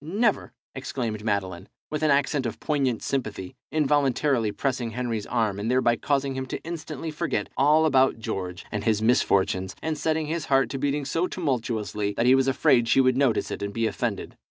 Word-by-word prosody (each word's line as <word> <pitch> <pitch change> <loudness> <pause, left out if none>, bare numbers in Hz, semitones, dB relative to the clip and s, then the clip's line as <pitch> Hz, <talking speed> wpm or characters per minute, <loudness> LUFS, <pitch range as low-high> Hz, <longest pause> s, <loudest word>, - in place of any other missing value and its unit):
never!" 205 - 0 0.2
exclaimed 120 -5 -4
Madeline, 95 -3 -2 0.2
with 150 0 -2
an 155 - +2
accent 140 -2 +2
of 115 - -6
poignant 135 -6 0
sympathy, 110 -9 -3 0.2
involuntarily 140 -5 +2
pressing 125 +2 -2
Henry's 115 -2 -3
arm, 110 -5 0
and 105 +3 -2
thereby 125 -2 +3
causing 140 +2 0
him 130 0 -4 0.2
instantly 165 -1 -5
to - - -15
forget 130 - -1
all 150 +3 +4
about 135 -4 +3
George 90 -5 -5
and 105 - -3
his 110 -2 +2
misfortunes, 95 -4 +1
and 160 0 -2
setting 160 0 0
his 160 +2 -3
heart 135 -1 +2
to 135 - -3
beating 145 +1 -1
so 165 +6 0
tumultuously 115 - -2
that 115 - +2
he 125 - +6
was 135 0 +3
afraid 135 -3 +3
she 135 - +4
would 130 -1 +4
notice 130 -4 +1
it - - -5
and 100 0 -3
be 115 0 +1
offended. 110 -2 -3
130 Hz, 185 wpm, -25 LUFS, 110-145 Hz, 0.2 s, he